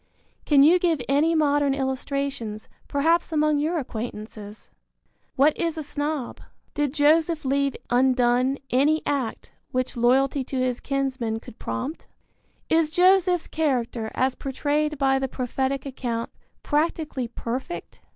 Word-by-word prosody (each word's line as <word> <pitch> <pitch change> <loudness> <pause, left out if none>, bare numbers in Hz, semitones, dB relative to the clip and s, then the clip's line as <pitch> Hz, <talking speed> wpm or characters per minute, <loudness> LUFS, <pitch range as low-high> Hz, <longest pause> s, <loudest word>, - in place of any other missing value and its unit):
Can 280 -2 +6
you 340 +5 +6
give 335 -4 +1
any 300 +4 +3
modern 290 -2 +2
illustrations, 265 -4 -3 0.2
perhaps 325 +5 +1
among 305 -1 +2
your 320 +4 0
acquaintances? 215 -5 -7 0.6
What 290 +3 +4
is 335 -2 -2
a 315 - -3
snob? 290 -2 -4 0.3
Did 290 -2 0
Joseph 310 +1 +3
leave 275 0 +1 0.2
undone 250 +1 +3
any 295 +5 +3
act 270 -6 -2 0.2
which 255 0 -2
loyalty 260 +3 +2
to 265 +1 -5
his 255 -1 0
kinsmen 260 -5 -2
could 220 - -14
prompt? 115 - -5 0.6
Is 320 -1 +3
Joseph's 360 +1 +4
character 245 -7 -1
as 260 0 +1
portrayed 295 +3 -1
by 270 -1 +2
the 265 - -1
prophetic 265 +2 -2
account 240 -4 -4 0.3
practically 300 -4 -1
perfect? 250 +8 -6
275 Hz, 125 wpm, -24 LUFS, 255-305 Hz, 0.6 s, Can